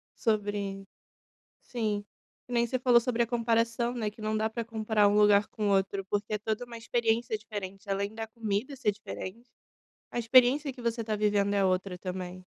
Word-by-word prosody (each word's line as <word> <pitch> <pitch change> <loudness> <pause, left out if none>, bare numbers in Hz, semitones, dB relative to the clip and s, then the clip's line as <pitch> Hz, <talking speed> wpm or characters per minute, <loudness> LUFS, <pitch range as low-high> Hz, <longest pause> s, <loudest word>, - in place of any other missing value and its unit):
sobre 205 -3 -1 0.8
sim, 215 -4 -2 0.4
que - - -14
nem 235 -1 +2
você 255 - 0
falou 245 -1 +6
sobre 240 0 +1
a - - -4
comparação 230 0 +1
né 225 -4 -2
que 210 - -19
não 215 0 -1
dá 215 +1 +1
para 230 +1 -4
comparar 220 -2 +2
um 205 - +2
lugar 210 -1 +5
com 210 -1 -3
o - - +3
outro, 195 0 0
porque 205 +1 -1
é - - +2
toda 220 +3 -3
uma 235 -1 -9
experiência 230 0 0
diferente 205 -2 -7
além 200 +1 -1
da 225 0 -5
comida 220 +3 -3
ser 245 -5 +1
diferente, 210 +2 -8 0.6
a - - -3
experiência 255 +4 +5
que 250 - -12
você 235 0 -1
tá 215 -1 -2
vivendo 205 -1 +2
é 200 -1 +3
outra 185 0 0
também. 185 0 -6
215 Hz, 190 wpm, -29 LUFS, 205-235 Hz, 0.8 s, falou